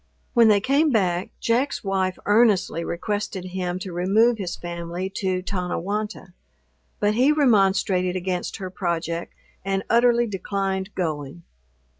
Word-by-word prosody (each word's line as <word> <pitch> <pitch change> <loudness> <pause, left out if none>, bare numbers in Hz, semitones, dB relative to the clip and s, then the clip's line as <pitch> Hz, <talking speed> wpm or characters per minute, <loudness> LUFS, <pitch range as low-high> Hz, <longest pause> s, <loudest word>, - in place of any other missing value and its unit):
When 235 -2 +6
they 210 -2 +5
came 280 +8 +2
back, 185 -7 +1
Jack's 250 +5 0
wife 190 -2 0
earnestly 205 -6 +3
requested 195 +1 -3
him 180 -1 -3
to 185 -1 -6
remove 215 +7 +3
his 180 -3 -3
family 175 +2 -5
to 185 -2 -1
Tonnewonta; 195 +1 -3 0.7
but 205 0 +2
he 255 +6 +4
remonstrated 195 -9 +2
against 180 -1 -3
her 185 -1 -6
project, 170 -2 -3 0.3
and 195 0 -1
utterly 240 0 +4
declined 195 -1 -3
going. 155 -2 -3
190 Hz, 125 wpm, -23 LUFS, 180-215 Hz, 0.7 s, When